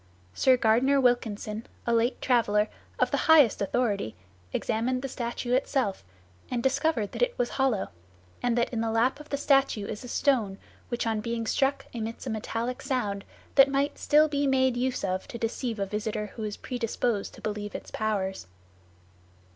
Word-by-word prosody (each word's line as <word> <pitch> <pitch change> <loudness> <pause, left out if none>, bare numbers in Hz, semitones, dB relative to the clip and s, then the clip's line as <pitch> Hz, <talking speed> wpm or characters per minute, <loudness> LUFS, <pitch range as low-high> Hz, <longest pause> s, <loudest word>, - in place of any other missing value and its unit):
Sir 260 -1 +4
Gardner 245 +5 +3
Wilkinson, 225 -3 0 0.2
a 235 - +1
late 230 +2 +2
traveller, 215 -4 +3 0.3
of - - +2
the - - 0
highest 295 -11 +6
authority, 200 - 0 0.4
examined 240 - -1
the - - -1
statue 240 -1 -3
itself, 255 -5 0 0.5
and 240 -2 -2
discovered 270 -5 +1
that - - -6
it - - +1
was 245 - 0
hollow, 260 -8 0 0.5
and 245 -1 +1
that 235 - +1
"in 225 - 0
the 225 - 0
lap 230 +5 +2
of 300 - -12
the 280 - -1
statue 275 -7 +2
is 210 +3 -6
a - - -7
stone, 235 -7 +1 0.3
which 240 -1 -2
on 220 -1 0
being 230 +1 -2
struck 275 +4 +1
emits 230 +1 -5
a 250 - -2
metallic 230 +3 -3
sound, 205 -7 -2 0.3
that 275 -1 +7
might 280 +1 0
still 305 +1 +5
be 285 -1 0
made 260 -2 +3
use 255 +1 -1
of 185 -1 -2
to - - -6
deceive 230 0 -2
a 200 - 0
visitor 210 +1 -3
who 225 - -6
was 210 -1 -3
predisposed 235 -3 -2
to - - -14
believe 210 -1 -4
its - - -7
powers." 195 - -2
235 Hz, 175 wpm, -28 LUFS, 215-260 Hz, 0.5 s, that